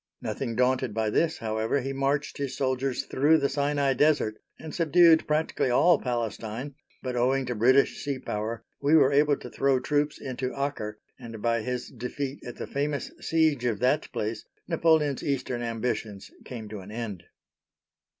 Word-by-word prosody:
Nothing 120 -4 -3
daunted 125 -2 +1
by 110 -1 0
this, 165 +5 +1
however, 110 +4 -1
he 135 +2 -3
marched 140 +2 -1
his 140 -2 -3
soldiers 130 -1 -1
through 150 +4 +3
the 140 -2 +1
Sinai 140 -1 +1
Desert 145 -5 +2 0.2
and 155 -2 -9
subdued 165 0 +5
practically 150 -3 0
all 165 +6 +5
Palestine, 120 +2 -3 0.3
but, 130 -1 -3
owing 130 +2 +2
to 125 - -2
British 130 +5 +3
sea 140 -2 -2
power, 110 -1 -4 0.2
we 145 +3 +4
were 145 -3 +5
able 145 0 +4
to - - -9
throw 135 -1 +2
troops 145 +3 0
into 130 -1 -4
Acre, 110 -7 -3 0.2
and 115 -2 -8
by 115 +1 +1
his 125 +1 -3
defeat 135 +3 -5
at 120 - -7
the - - -5
famous 145 +1 -2
siege 155 -6 +1
of 115 -4 +1
that 130 +4 +1
place, 110 -2 -3 0.2
Napoleon's 160 -4 +2
eastern 130 -3 -2
ambitions 115 -3 -3
came 115 -4 -7
to 105 -1 -6
an 95 +1 -11
end. 105 -5 -5
130 Hz, 165 wpm, -27 LUFS, 115-145 Hz, 0.3 s, subdued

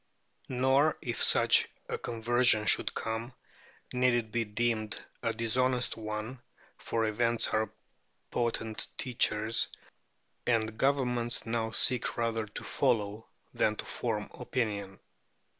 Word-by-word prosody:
Nor, 130 +4 +3
if 120 -1 -2
such - - +5 0.2
a - - -2
conversion 115 -1 +3
should - - +3
come, 115 +3 -3 0.6
need 125 -1 +3
it 115 -2 -1
be 115 +1 +1
deemed 110 0 -1 0.2
a 115 - 0
dishonest 125 +2 +1
one, 110 +3 -5 0.4
for 115 -1 -1
events 115 +2 +1
are 110 -1 0 0.6
potent 115 -2 -1
teachers, 115 -2 +1 0.8
and 110 -2 +1
governments 125 -3 +1
now 115 -1 -1
seek 125 +2 +1
rather 115 -2 -1
to 105 - -8
follow 110 -4 0 0.3
than 105 - +2
to - - -6
form 110 -3 -2
opinion. 100 -6 -3
115 Hz, 115 wpm, -31 LUFS, 110-125 Hz, 0.8 s, such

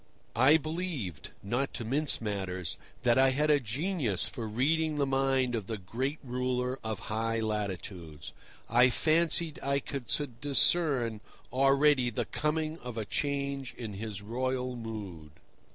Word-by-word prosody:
I 130 +7 +6
believed—not 140 - -3
to 120 - -4
mince 145 +6 +1
matters—that 100 +3 -1
I 135 0 +6
had 150 +3 +2
a 145 - +5
genius 130 - +1
for 115 -5 -5
reading 155 +8 +1
the 145 -1 +1
mind 135 -2 +1
of 110 -4 -2
the 110 - -3
great 130 - -3
ruler 125 0 -1
of 110 -1 -3
high 115 +1 0
latitudes. 95 -7 -4 0.3
I 120 +3 +5
fancied 160 +2 +2
I 140 0 +1
could 140 -3 -5 0.3
discern 140 -6 +3 0.3
already 135 -1 +4
the 115 - -2
coming 155 +1 -1
of 125 -2 -7
a 110 - -2
change 140 0 -2
in 110 -4 -5
his 100 0 -5
royal 125 +3 -2
mood. 100 -10 -7
125 Hz, 135 wpm, -30 LUFS, 110-140 Hz, 0.3 s, I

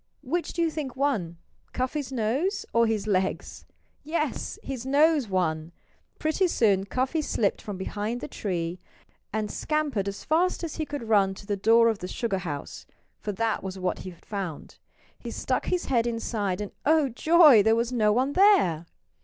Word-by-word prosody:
Which 335 +7 -2
do 340 - 0
you 325 - +1
think 285 -5 -5
won 220 -12 -1 0.4
Cuffy's 260 +2 -2
nose 265 - -1
or 230 0 +4
his 215 -2 -1
legs?... 190 -2 -2 0.4
Yes! 310 -2 -2
His 260 -3 -5
nose 290 0 +3
won! 165 -3 -1 0.4
Pretty 315 +5 +1
soon 200 - +2
Cuffy 260 +8 0
slipped 215 -8 0
from 205 -3 -6
behind 210 +5 -3
the - - -6
tree 175 -3 -3 0.5
and 215 0 -2
scampered 295 -10 -1
as 200 0 -5
fast 345 +4 +1
as 330 - -4
he 310 -2 -2
could 290 -4 -5
run 200 -3 +3
to 200 - -12
the 205 0 -1
door 225 +4 +5
of 220 -3 0
the 180 - -5
sugar 200 -1 -2
house 150 -6 -6 0.3
for 210 - -3
that 225 +2 -1
was 190 0 -6
what 185 -1 -2
he 185 - -7
had 170 -2 -16
found. 190 -7 -6 0.4
He - - -7
stuck - - -2
his 360 -1 0
head 240 -3 +1
inside 215 -4 -2
and 205 - -5
oh, 310 -1 +4
joy! 300 -1 +6
there 220 +2 +4
was 235 +1 0
no 215 -4 +3
one 260 +6 +1
there. 325 - +4
230 Hz, 180 wpm, -26 LUFS, 195-290 Hz, 0.5 s, joy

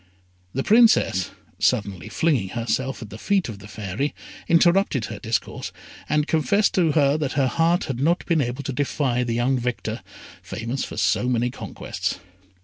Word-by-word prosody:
The 135 - 0
Princess, 220 - +4 0.3
suddenly 100 -4 0
flinging 135 - +1
herself 130 +2 -1
at 105 - -11
the 105 - -8
feet 200 -3 +1
of 105 -3 -7
the 100 - -11
Fairy, 110 +7 -3 0.3
interrupted 170 - +3
her 105 -2 -7
discourse, 110 +2 -3 0.4
and 150 -1 +2
confessed 200 +7 +2
to 165 -5 +3
her 145 -1 +3
that 145 -3 -1
her 140 -2 +2
heart 165 +7 +2
had 130 -3 -4
not 170 +6 +1
been 165 -4 +2
able 125 +2 -3
to 135 - -3
defy 130 -2 0
the 115 -1 -1
young 125 +2 +1
victor, 125 0 -3 0.4
famous 115 +7 -4
for - - -7
so 105 +5 +2
many 120 0 +1
conquests. - - -4
130 Hz, 165 wpm, -23 LUFS, 115-155 Hz, 0.4 s, Princess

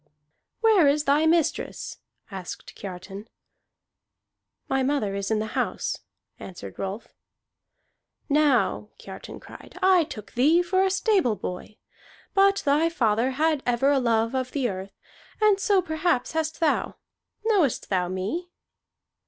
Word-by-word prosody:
"Where 430 -9 +5
is 290 +1 +2
thy 300 +2 +3
mistress?" 330 -1 0 0.3
asked 190 -3 -8
Kiartan. 195 +2 -8 1.4
"My 270 0 +1
mother 260 -7 0
is 200 0 -3
in 220 - +1
the 220 +1 -4
house," - - -2 0.4
answered 135 - -9
Rolf. 195 +3 -5 1.2
"Now," 295 -3 +2
Kiartan - - -10
cried, - - -13
"I 370 -3 +5
took 210 -7 -9
thee 310 +8 +3
for 375 +2 +2
a 385 - +2
stable 380 - +2
boy. 185 +3 -7 0.6
But 395 0 +3
thy 295 +4 +3
father 235 -5 +1
had 310 +1 +1
ever 245 +3 +2
a 280 - +3
love 230 -1 +1
of 255 -1 -2
the 275 -4 0
earth, 190 0 -7 0.4
and 425 -2 +4
so 395 -1 +2
perhaps 315 -5 0
hast 320 0 -2
thou. 320 -2 +1 0.5
Knowest 380 - +1
thou 180 -2 +1
me?" 200 - -3
280 Hz, 130 wpm, -25 LUFS, 215-335 Hz, 1.4 s, Where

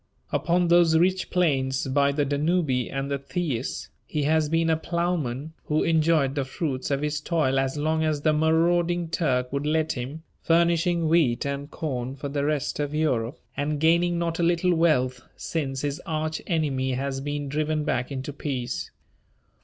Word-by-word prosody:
Upon 175 +1 +1
those 170 -2 +5
rich 185 +3 +2
plains 135 -7 +1
by 140 +1 +2
the 145 0 0
Danube 150 +3 +1 0.2
and 135 +1 -3
the 140 - -1
Theis, 140 -4 -3 0.2
he 150 -2 -1
has 155 +1 +2
been 165 +1 +2
a - - +4
plowman 160 -4 -2
who 150 0 +1
enjoyed 160 -4 +2
the 140 -1 -1
fruits 135 0 -3
of 140 0 0
his 150 0 -1
toil 150 -5 +1
as 135 +2 -1
long 160 +2 +1
as 155 -2 0
the 155 0 +3
marauding 170 +2 +2
Turk 130 -6 0
would 140 +1 -1
let 155 +1 +1
him, 135 +6 -5 0.2
furnishing 170 0 +2
wheat 155 -8 +2
and 140 +1 -3
corn 130 -5 -4
for 140 +1 -5
the 140 0 -1
rest 150 -2 -1
of 145 0 -2
Europe, 130 -4 0 0.2
and 145 +1 -1
gaining 170 +2 +3
not 170 -1 -2
a - - +2
little 175 +1 +2
wealth 130 -7 +2 0.2
since 135 -5 -3
his 145 0 -3
arch 155 0 -2
enemy 140 -6 0
has 135 +1 -2
been 145 0 -3
driven 155 +2 -1
back 125 -2 -1
into 135 +1 -4
peace. 130 -4 -4
150 Hz, 170 wpm, -25 LUFS, 135-165 Hz, 0.2 s, those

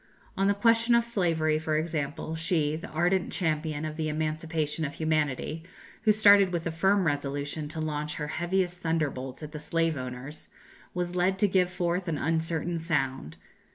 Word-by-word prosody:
On 195 +1 +2
the 200 - +3
question 230 +3 +4
of 235 0 +3
slavery, 165 -8 +1
for 155 -1 0
example, 155 -1 -3
she, 160 -2 +1
the 160 - -6
ardent 175 +4 +1
champion 155 -3 -1
of 155 0 -5
the 155 -1 -1
emancipation 155 0 -2
of 145 -1 -3
humanity, 155 -1 -1 0.4
who 220 0 +5
started 205 -3 +6
with 170 -2 -1
the 165 - -2
firm 190 +4 +2
resolution 145 0 -2
to 160 +2 -6
launch 150 -1 -2
her 150 - -3
heaviest 175 +3 -1
thunderbolts 150 -5 -2
at 150 - -7
the 150 - -6
slave 165 +1 0
owners, 130 +4 -7 0.5
was 180 0 -2
led 185 +2 +2
to 205 - +4
give 185 -2 +2
forth 180 +1 -1
an 160 -3 -1
uncertain 165 +2 -1
sound. 135 - -2
160 Hz, 170 wpm, -28 LUFS, 150-180 Hz, 0.5 s, started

